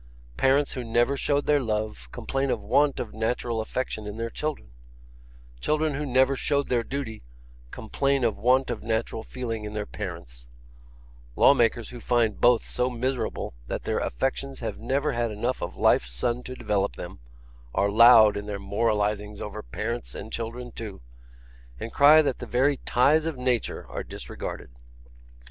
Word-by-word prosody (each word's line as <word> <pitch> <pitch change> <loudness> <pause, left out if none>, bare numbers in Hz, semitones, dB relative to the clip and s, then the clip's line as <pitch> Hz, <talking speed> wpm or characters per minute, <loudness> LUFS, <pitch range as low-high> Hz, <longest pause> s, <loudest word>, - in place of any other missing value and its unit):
'Parents 135 - +2
who 130 - -4
never 120 +4 +2
showed 145 +1 0
their 150 -1 +4
love, 105 - -3
complain 135 0 -2
of 120 - 0
want 140 +8 +2
of 115 - -5
natural 115 +1 -1
affection 110 -2 -4
in 105 +1 -6
their 115 0 -3
children; 150 - -4 0.9
children 155 - 0
who 145 +1 -3
never 130 +1 +3
showed 140 +1 0
their 120 -2 +2
duty, 120 -3 -5 0.5
complain 140 - -1
of 115 -3 +2
want 130 +5 +2
of - - -4
natural 110 0 -2
feeling 115 -2 -5
in 105 0 -6
their 105 -1 -2
parents; 85 -14 -8 0.9
law - - +7
makers 115 -3 +1
who 125 - -9
find 115 -4 +1
both 120 -1 +4
so 125 +1 0
miserable 125 - -2
that - - -4
their - - -1
affections 135 - -2
have 115 - -5
never 140 +6 0
had 120 -2 -1
enough 120 +4 -2
of 85 - -5
life's - - +3
sun 120 - -1
to 130 0 -8
develop 105 -5 -1
them, - - -8 0.6
are 100 +1 +2
loud 110 -1 +8
in 100 0 -5
their 105 -1 -3
moralisings 105 0 -1
over 105 +1 -6
parents 115 +3 -5
and 110 - -8
children 120 +2 -5
too, 110 -5 -7 0.8
and 115 - -6
cry 150 +2 +7
that 135 -4 -1
the - - -7
very 135 +3 +2
ties 150 +6 +4
of 160 -5 -3
nature 125 -2 -1
are - - -5
disregarded. - - -7
120 Hz, 165 wpm, -26 LUFS, 105-135 Hz, 0.9 s, loud